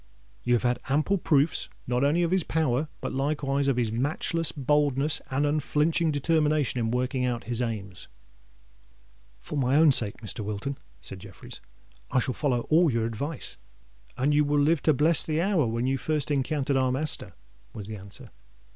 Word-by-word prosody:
You 120 0 +2
have 120 - -1
had 120 0 +1
ample 155 +8 +1
proofs 150 -1 +1 0.2
not 125 +1 0
only 155 +5 +3
of 170 - 0
his 190 0 +3
power, 155 -3 0
but - - -4
likewise 140 0 0
of 135 -3 +1
his 115 -3 0
matchless 145 +6 0
boldness 145 0 +1
and 135 +2 0
unflinching 150 +2 +1
determination 150 -2 +1
in 115 -1 0
working 125 +2 -1
out 120 -3 -1
his 120 +3 -3
aims." 105 -6 -4 1.3
"For 145 - -4
my 130 +1 +2
own 155 0 +6
sake, 110 -6 +2
Mr. 105 -3 -4
Wilton," 105 +6 -4 0.2
said 95 - -8
Jeffreys, - - -11 0.5
"I - - 0
shall 130 0 +1
follow 125 -4 0
all 165 +1 +5
your 115 -1 0
advice." 135 +7 -4 0.6
"And 140 +4 +2
you 150 0 +4
will 145 0 +1
live 150 +1 +3
to 155 - +5
bless 155 +4 +3
the 155 0 -1
hour 175 - +2
when 115 +2 -1
you 135 +1 0
first 150 -2 -1
encountered 140 0 0
our 130 -1 +2
master," 150 +4 -3 0.4
was 105 -3 -8
the 110 +1 -6
answer. 100 0 -11
140 Hz, 175 wpm, -27 LUFS, 120-150 Hz, 1.3 s, own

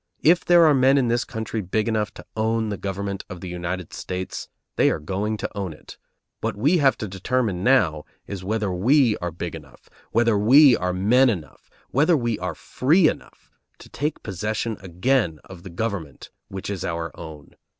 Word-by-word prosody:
If 170 +3 +5
there 175 -1 +6
are 155 - +6
men 135 +1 +4
in 125 -3 +2
this 120 +1 +1
country 110 -1 -4
big 105 +4 -1
enough 110 -2 0
to - - -11
own 110 0 0
the 100 - -3
government 100 0 -4
of 90 - -7
the 90 - -7
United 90 0 -5
States, 90 0 -5 0.3
they - - +4
are - - 0
going 95 +8 -3
to - - -4
own 95 -5 -3
it; 75 - -14 0.4
what - - -2
we 150 - +3
have 135 -3 +3
to 110 - -4
determine 95 0 -1
now 90 - +3 0.2
is 100 -2 -7
whether 105 0 -1
we 120 +5 +3
are 90 - -3
big 85 +1 -6
enough, 75 -5 -13 0.2
whether 115 -1 +3
we 130 +5 +7
are 90 0 -1
men 115 +8 +4
enough, 90 -9 -6 0.2
whether 155 +5 +3
we 120 -4 -1
are 90 -2 -4
free 155 - +2
enough, 60 - -6 0.3
to - - -15
take 150 +4 -3
possession 105 +3 -3
again 95 - 0
of 90 -2 -12
the 95 - -10
government 90 -5 -5 0.2
which 95 +1 -6
is 95 -3 -4
our 85 -2 -4
own. 80 -4 -11
105 Hz, 190 wpm, -23 LUFS, 90-120 Hz, 0.4 s, we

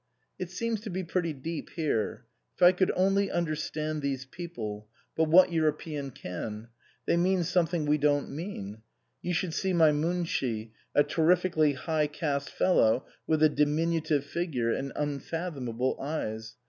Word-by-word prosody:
" 130 - -46
It 180 - -4
seems 225 +4 -2
to 220 - -6
be 185 0 -3
pretty 170 -1 -1
deep 155 +3 -5
here. 150 -10 -1 0.3
If - - -1
I 175 - +10
could 185 0 +2
only 195 +1 +2
understand 155 -2 -2
these 135 -1 -2
people 115 -10 -6 0.3
but 160 - +3
what 175 +3 +6
Euro 160 -2 +3
pean 150 -2 -5
can? 105 +1 -6 0.4
They - - +2
mean 180 +1 +2
something 170 -2 +1
we 150 +1 +2
don't 145 -1 +2
mean.... 110 - -6 0.4
You 175 -1 -1
should 170 -1 -1
see 190 +2 0
my 160 -3 +6
Munshi, 145 -8 -1 0.2
a 145 - +6
terrifically 165 -2 +3
high 155 +2 0
caste 145 -2 -2
fellow 125 -9 +3 0.2
with 155 -1 +2
a - - +9
diminutive 150 0 +1
figure 140 -8 -1
and 135 0 -3
unfathomable 140 -4 -2
eyes. 110 -7 -4
155 Hz, 155 wpm, -29 LUFS, 140-175 Hz, 0.4 s, I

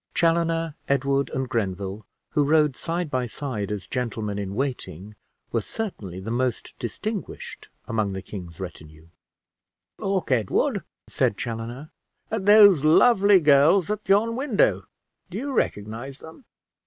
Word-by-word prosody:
Chaloner, 165 -1 +1 0.2
Edward, 140 0 +1
and 130 0 -2
Grenville, 100 -3 -3 0.2
who 150 - +2
rode 150 -1 +3
side 170 0 -3
by 125 -1 0
side 115 -7 -4
as 100 -3 -4
gentlemen 110 -3 -3
in 100 -1 -4
waiting, 110 - -4 0.4
were 115 - +1
certainly 105 - -5
the 105 +4 -5
most 125 0 -1
distinguished 205 - -5 0.2
among 110 -3 -1
the 95 0 -5
king's 90 -5 -9
retinue. 80 -3 -9 0.9
"Look, 195 -6 -1
Edward," 115 -6 +1 0.2
said 100 - 0
Chaloner, 120 +5 -5 0.4
"at 210 -3 -2
those 205 -7 +8
lovely 200 +4 +6
girls 155 +6 +5
at 210 -2 -4
yon 220 +4 +3
window. 200 - +1 0.4
Do 185 - -6
you 275 +4 -3
recognize 115 - -2
them?" 160 - -13
135 Hz, 130 wpm, -25 LUFS, 105-170 Hz, 0.9 s, those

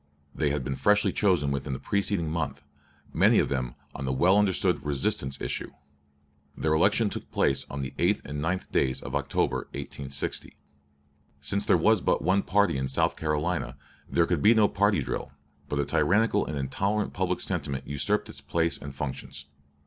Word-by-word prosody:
They 75 - 0
had 70 -1 -1
been 70 +1 -3
freshly 105 +8 +3
chosen 90 -9 +2
within 70 0 -2
the 65 - -4
preceding 100 -4 0
month; 80 0 -3 0.5
many - - +5
of - - +3
them 65 -3 -2 0.2
on 70 - -6
the 65 - 0
well 85 +9 +4
understood 100 -3 +1
"resistance" 70 -1 -1
issue. - - -3 0.9
Their 80 - +1
election 100 +6 +3
took - - -6
place 70 0 +1
on 70 0 -4
the 65 +1 -5
8th - - +1
and 75 +1 -4
9th 90 +3 -2
days 65 -1 +1
of - - -7
October, - - 0 0.2
1860. 70 0 -5 0.8
Since 100 +8 -1
there - - +5
was 105 +4 +3
but - - +1
one 95 +4 +3
party 100 -8 +2
in 65 0 -1
South 65 - +1
Carolina, 75 -3 -2 0.3
there 85 - +3
could 85 -4 0
be 110 +3 +6
no 110 -2 +5
party 100 -6 +2
drill; 65 - -4 0.4
but 75 - -1
a 70 - +1
tyrannical 100 +9 +2
and 75 - -3
intolerant 100 +10 -1
public - - -1
sentiment 70 -2 -2
usurped 70 -1 0
its - - -8
place 85 0 0
and 70 -1 -8
functions. 70 0 -5
75 Hz, 175 wpm, -27 LUFS, 70-100 Hz, 0.9 s, be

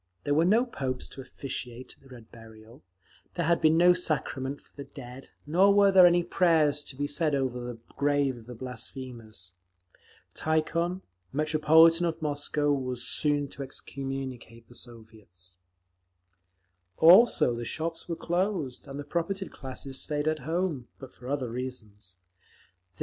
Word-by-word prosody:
There 145 - 0
were 160 +3 +3
no 220 +7 +4
popes 130 - -4
to 135 - -9
officiate 130 -2 -7
at - - -32
the 135 - -19
Red 120 -4 -14
Burial, 115 0 -15 0.5
there 175 - -1
had 170 +1 +2
been 160 0 +4
no 175 +1 +6
sacrament 145 -5 -2
for - - -29
the 140 - -7
dead, 130 -1 -11 0.2
nor 180 +7 +4
were 195 -2 +7
any 175 0 +3
prayers 160 -5 +2
to 135 - -9
be 145 +2 -2
said 145 +1 +1
over 130 -2 -1
the 120 -1 -6 0.2
grave 145 -2 +1
of 115 -2 -13
the 125 - -8
blasphemers. 120 -6 -7 0.8
Tikhon, 170 +3 -1 0.3
Metropolitan 160 +3 +4
of 165 -1 -3
Moscow, 145 -1 0
was 125 -3 -3
soon 145 -1 +1
to 140 - -9
excommunicate 130 -4 -6
the - - -16
Soviets…. 110 -7 -11 1.4
Also 175 - +6
the 120 0 -4
shops 165 +7 -4
were 170 - -1
closed, 175 -7 -2
and 140 +1 -7
the - - -4
propertied 170 +5 -3
classes 135 0 -5
stayed 150 0 -1
at 155 0 +1
home—but 145 -4 -4
for 125 - -12
other 130 -3 -2
reasons. 110 -7 -7
140 Hz, 145 wpm, -28 LUFS, 125-165 Hz, 1.4 s, were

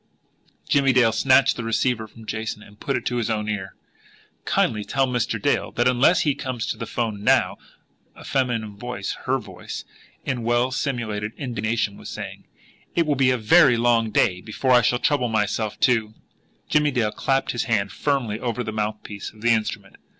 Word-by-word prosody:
Jimmie 135 -2 +3
Dale 120 -3 +5
snatched 130 +3 +4
the 120 - -4
receiver 115 0 0
from 110 +1 -15
Jason, 110 0 -4
and 105 0 -17
put 135 - -1
it 120 - -6
to 125 - -1
his 115 -1 -1
own 105 -1 -1
ear. 100 -3 -4 0.7
"Kindly 105 -2 +1
tell 135 +5 +1
Mr. 125 -3 -1
Dale - - 0
that 120 - +2
unless 125 +7 +4
he 145 - +2
comes 125 -4 -4
to - - -3
the 115 - -5
'phone 110 -4 -3
now," - - +3 0.6
a - - -13
feminine 120 -6 -1
voice, 120 -3 -4
her - - +2
voice, - - -8 0.4
in 125 -2 -2
well 120 +2 +1
simulated 115 -6 -2
indignation, 115 -4 -2
was - - -9
saying, - - -7 0.5
"it 170 - +3
will 150 - +2
be 135 -2 +3
a 130 - +2
very 125 +2 +5
long 115 -1 +2
day 90 -3 +2
before 130 +6 -1
I 125 -1 +7
shall 125 +2 +2
trouble 140 -1 +1
myself 110 0 -1
to 110 -3 +2 0.3
" - - -40
Jimmie 150 -1 +4
Dale 120 -6 0
clapped 135 +3 0
his 120 - -2
hand 110 -5 0
firmly 130 -7 -1
over 120 0 -2
the 110 - -4
mouthpiece 105 -1 -4
of 110 - -18
the 120 +1 +3
instrument. 110 -2 -2
120 Hz, 185 wpm, -23 LUFS, 110-130 Hz, 0.7 s, I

